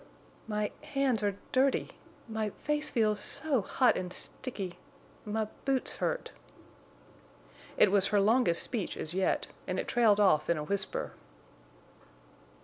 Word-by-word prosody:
"My 210 Hz, -1 st, -1 dB
hands—are 265 Hz, -9 st, 0 dB, 0.2 s
dirty; 265 Hz, +1 st, +2 dB, 0.4 s
my 220 Hz, -1 st, -2 dB
face 300 Hz, +7 st, -2 dB
feels—so 230 Hz, +4 st, +1 dB
hot 250 Hz, +6 st, +3 dB
and 180 Hz, -1 st, -3 dB
sticky; 195 Hz, -4 st, -5 dB, 0.5 s
my 215 Hz, +1 st, -1 dB, 0.2 s
boots 270 Hz, -2 st, 0 dB
hurt." -, -, -2 dB, 1.5 s
It 205 Hz, -, +6 dB
was 200 Hz, -1 st, +4 dB
her 210 Hz, -, +3 dB
longest 210 Hz, -4 st, +3 dB
speech 225 Hz, -7 st, -3 dB
as 160 Hz, -, -2 dB
yet, 190 Hz, +1 st, +1 dB, 0.2 s
and -, -, -1 dB
it -, -, -3 dB
trailed 220 Hz, -4 st, +4 dB
off 185 Hz, -7 st, +4 dB
in 170 Hz, -, +3 dB
a 150 Hz, -, -3 dB
whisper. 195 Hz, +4 st, -2 dB
215 Hz, 125 wpm, -31 LUFS, 195-255 Hz, 1.5 s, It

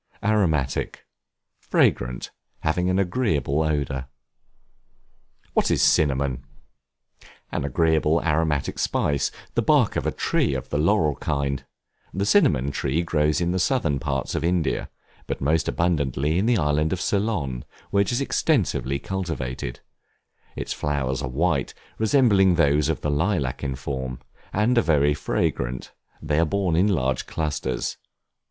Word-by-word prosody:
Aromatic, 85 Hz, -11 st, 0 dB, 0.5 s
fragrant, -, -, +1 dB, 0.3 s
having 90 Hz, +4 st, 0 dB
an 95 Hz, -, +1 dB
agreeable 90 Hz, -, +1 dB
odor. 70 Hz, -4 st, -1 dB, 1.5 s
What -, -, +2 dB
is -, -, +2 dB
Cinnamon? 70 Hz, -3 st, +2 dB, 1.1 s
An -, -, -2 dB
agreeable, 80 Hz, +2 st, +2 dB
aromatic 75 Hz, -3 st, 0 dB
spice, 70 Hz, -2 st, +1 dB, 0.2 s
the -, -, +1 dB
bark -, -, +3 dB
of -, -, -1 dB
a -, -, +1 dB
tree 70 Hz, -, 0 dB
of 65 Hz, -, -5 dB
the 75 Hz, -, -1 dB
laurel 80 Hz, -3 st, +2 dB
kind; 70 Hz, -2 st, -2 dB, 0.5 s
the 100 Hz, +2 st, -1 dB
Cinnamon 75 Hz, -, +3 dB
tree 70 Hz, +4 st, -1 dB
grows 75 Hz, -2 st, +1 dB
in 85 Hz, 0 st, 0 dB
the 95 Hz, -, 0 dB
Southern 85 Hz, -, +1 dB
parts 70 Hz, -2 st, -2 dB
of -, -, -2 dB
India; 85 Hz, -1 st, 0 dB, 0.4 s
but -, -, -3 dB
most 75 Hz, +3 st, +1 dB
abundantly 75 Hz, -2 st, 0 dB
in 105 Hz, -, +1 dB
the 120 Hz, -1 st, +3 dB
island 75 Hz, -1 st, +1 dB
of 95 Hz, -, -1 dB
Ceylon, 90 Hz, -, -1 dB, 0.3 s
where 100 Hz, -, +3 dB
it 100 Hz, -, 0 dB
is 120 Hz, +3 st, 0 dB
extensively 110 Hz, -, +1 dB
cultivated; 70 Hz, -9 st, -4 dB, 0.7 s
its -, -, -3 dB
flowers 70 Hz, -3 st, -2 dB
are 65 Hz, -, -3 dB
white, 80 Hz, +7 st, 0 dB, 0.2 s
resembling 105 Hz, -6 st, +4 dB
those 75 Hz, -2 st, +3 dB
of 80 Hz, -, -1 dB
the 75 Hz, -, -1 dB
lilac 75 Hz, -4 st, 0 dB
in 70 Hz, -2 st, -2 dB
form, 65 Hz, -1 st, -4 dB, 0.3 s
and 115 Hz, +4 st, +2 dB
are -, -, +4 dB
very 75 Hz, -4 st, +3 dB
fragrant; 65 Hz, -3 st, -2 dB, 0.3 s
they 75 Hz, 0 st, 0 dB
are 85 Hz, -, +4 dB
borne 90 Hz, 0 st, 0 dB
in 90 Hz, +5 st, +4 dB
large 65 Hz, -10 st, 0 dB
clusters. 70 Hz, -5 st, -2 dB
75 Hz, 140 wpm, -24 LUFS, 70-90 Hz, 1.5 s, resembling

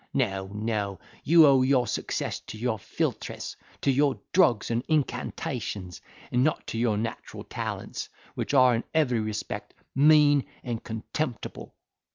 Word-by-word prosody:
No, 95 Hz, -7 st, 0 dB
no, 105 Hz, -3 st, -2 dB, 0.2 s
you 165 Hz, +1 st, +7 dB
owe 135 Hz, -2 st, +6 dB
your 130 Hz, -1 st, +3 dB
success -, -, -2 dB
to -, -, -7 dB
your 115 Hz, -1 st, -1 dB
philtres, -, -, -3 dB, 0.3 s
to 140 Hz, -, +3 dB
your 140 Hz, +1 st, +2 dB
drugs 125 Hz, -, +4 dB
and 115 Hz, +1 st, 0 dB
incantations; 105 Hz, -, -2 dB, 0.3 s
and 125 Hz, +1 st, +3 dB
not 155 Hz, +1 st, 0 dB
to 115 Hz, -, -4 dB
your 115 Hz, -3 st, +2 dB
natural 115 Hz, +1 st, -5 dB
talents, -, -, -5 dB, 0.2 s
which -, -, -2 dB
are, 130 Hz, -2 st, +7 dB
in 115 Hz, -, 0 dB
every 130 Hz, -7 st, +3 dB
respect, 110 Hz, -1 st, -4 dB, 0.2 s
mean 145 Hz, 0 st, +6 dB, 0.2 s
and 120 Hz, -3 st, -4 dB
contemptible." 110 Hz, -, -5 dB
120 Hz, 140 wpm, -27 LUFS, 110-140 Hz, 0.3 s, you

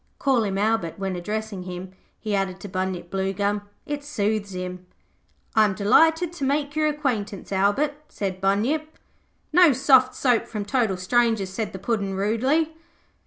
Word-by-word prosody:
Call 265 Hz, -4 st, +2 dB
him 195 Hz, -2 st, -2 dB
Albert 205 Hz, -5 st, 0 dB
when 195 Hz, -1 st, -3 dB
addressing 210 Hz, +2 st, -4 dB
him,' 180 Hz, 0 st, -7 dB, 0.3 s
he 215 Hz, -1 st, -3 dB
added 195 Hz, -2 st, -1 dB
to 205 Hz, -, -6 dB
Bunyip 185 Hz, -2 st, -3 dB
Bluegum. 200 Hz, +2 st, -1 dB, 0.2 s
'It 290 Hz, -1 st, -4 dB
soothes 210 Hz, -7 st, -1 dB
him.' 180 Hz, 0 st, -6 dB, 0.7 s
'I 220 Hz, -, +6 dB
am 205 Hz, -, 0 dB
delighted 320 Hz, -, +4 dB
to 345 Hz, -, -6 dB
make 285 Hz, +2 st, 0 dB
your 310 Hz, 0 st, +2 dB
acquaintance, 245 Hz, -, -2 dB
Albert,' 240 Hz, +10 st, +1 dB
said 190 Hz, -2 st, -4 dB
Bunyip. 250 Hz, +12 st, 0 dB, 0.6 s
'No 350 Hz, -3 st, +7 dB
soft 260 Hz, 0 st, +4 dB
soap 245 Hz, -4 st, +2 dB
from 210 Hz, -3 st, -4 dB
total 215 Hz, -3 st, +1 dB
strangers,' 220 Hz, 0 st, +1 dB
said 215 Hz, +3 st, -3 dB
the -, -, -7 dB
Puddin', 200 Hz, -1 st, -2 dB
rudely. 260 Hz, +11 st, +1 dB
210 Hz, 155 wpm, -24 LUFS, 195-270 Hz, 0.7 s, No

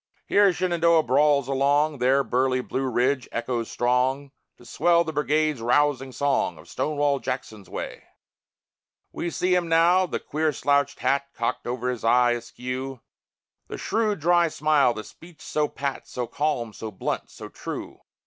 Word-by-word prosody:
Here 200 Hz, -1 st, +4 dB
Shenandoah 170 Hz, -2 st, +2 dB
brawls 140 Hz, +1 st, +3 dB
along, 140 Hz, +2 st, +1 dB
There 130 Hz, +3 st, +3 dB
burly 130 Hz, 0 st, +1 dB
Blue 130 Hz, +1 st, -2 dB
Ridge 130 Hz, +2 st, 0 dB
echoes 120 Hz, -1 st, -3 dB
strong, 130 Hz, +3 st, 0 dB, 0.3 s
To 120 Hz, -, -18 dB
swell 170 Hz, +7 st, +3 dB
the 160 Hz, -1 st, -5 dB
Brigade's 150 Hz, -2 st, +1 dB
rousing 135 Hz, +2 st, +1 dB
song 135 Hz, -, 0 dB
Of 75 Hz, +3 st, -15 dB
"Stonewall 145 Hz, -, 0 dB
Jackson's 120 Hz, -7 st, -5 dB
way." -, -, -6 dB, 1.1 s
We 175 Hz, -, -3 dB
see 180 Hz, +2 st, 0 dB
him 175 Hz, -2 st, +1 dB
now 175 Hz, +3 st, +4 dB
the -, -, -3 dB
queer 155 Hz, +1 st, -1 dB
slouched 140 Hz, +1 st, +1 dB
hat 140 Hz, 0 st, +1 dB
Cocked 115 Hz, +1 st, -2 dB
o'er 125 Hz, +1 st, -2 dB
his 125 Hz, -, -6 dB
eye 120 Hz, +1 st, +4 dB
askew; 125 Hz, +2 st, -5 dB, 0.7 s
The -, -, -6 dB
shrewd, 215 Hz, -5 st, -1 dB
dry 175 Hz, +1 st, +4 dB
smile; 150 Hz, -5 st, +2 dB
the 110 Hz, -, -5 dB
speech 165 Hz, +5 st, -15 dB
so 150 Hz, -1 st, 0 dB
pat, 140 Hz, -2 st, -5 dB
So 125 Hz, -, -4 dB
calm, 120 Hz, -5 st, -2 dB
so 110 Hz, -, -6 dB
blunt, 95 Hz, -, -4 dB
so -, -, -10 dB
true. -, -, -7 dB
140 Hz, 155 wpm, -25 LUFS, 125-155 Hz, 1.1 s, Here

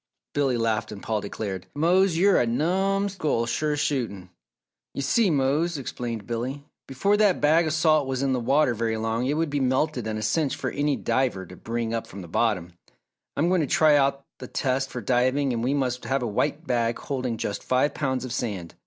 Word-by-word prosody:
Billy 135 Hz, -4 st, +1 dB
laughed 115 Hz, -2 st, -1 dB
and 100 Hz, -2 st, -9 dB
Paul 110 Hz, -2 st, -1 dB
declared, 95 Hz, -2 st, -5 dB
"Mose, 175 Hz, +3 st, +3 dB
you're 195 Hz, +2 st, +4 dB
a 120 Hz, -, +1 dB
numm 190 Hz, +10 st, +1 dB
skull, 155 Hz, -11 st, -1 dB
sure 150 Hz, +5 st, 0 dB
as 145 Hz, -, -2 dB
shootin'." 105 Hz, -11 st, -2 dB, 0.6 s
"You 140 Hz, -, -2 dB
see, 205 Hz, -, +3 dB
Mose," 150 Hz, +3 st, +1 dB
explained 120 Hz, -5 st, -5 dB
Billy, 125 Hz, +5 st, -4 dB, 0.2 s
"before 195 Hz, +11 st, +1 dB
that 205 Hz, -4 st, +3 dB
bag 160 Hz, +3 st, +4 dB
of 155 Hz, -, -1 dB
salt 155 Hz, -3 st, +3 dB
was 135 Hz, 0 st, -2 dB
in 135 Hz, -1 st, +1 dB
the 125 Hz, -, 0 dB
water 135 Hz, +2 st, +2 dB
very 115 Hz, 0 st, -1 dB
long 115 Hz, +3 st, -1 dB
it 145 Hz, -, +1 dB
would 160 Hz, -1 st, -1 dB
be 145 Hz, -, 0 dB
melted 130 Hz, -2 st, 0 dB
and 110 Hz, -1 st, -2 dB
a 110 Hz, -, -4 dB
cinch 140 Hz, +7 st, +1 dB
for -, -, -3 dB
any 145 Hz, 0 st, 0 dB
diver 125 Hz, -8 st, -1 dB
to 90 Hz, -, -12 dB
bring 115 Hz, +2 st, -3 dB
up 115 Hz, -, -3 dB
from 95 Hz, 0 st, -9 dB
the -, -, -10 dB
bottom. 90 Hz, -3 st, 0 dB, 0.6 s
I -, -, +1 dB
am 170 Hz, -, +3 dB
going 185 Hz, -2 st, +3 dB
to 150 Hz, -, 0 dB
try 155 Hz, -1 st, +4 dB
out 140 Hz, -1 st, +1 dB
the 125 Hz, -, -7 dB
test 135 Hz, +2 st, -1 dB
for 125 Hz, -, -5 dB
diving 130 Hz, +4 st, +1 dB
and 115 Hz, -1 st, -2 dB
we 135 Hz, +3 st, +1 dB
must 125 Hz, -3 st, -1 dB
have 135 Hz, -1 st, 0 dB
a -, -, -1 dB
white 145 Hz, +9 st, -1 dB
bag 120 Hz, -3 st, 0 dB
holding 130 Hz, -4 st, -3 dB
just 100 Hz, -2 st, -3 dB
five 130 Hz, +3 st, +1 dB
pounds 130 Hz, -3 st, -2 dB
of 125 Hz, -, -5 dB
sand. 100 Hz, -8 st, -4 dB
130 Hz, 215 wpm, -25 LUFS, 115-150 Hz, 0.6 s, you're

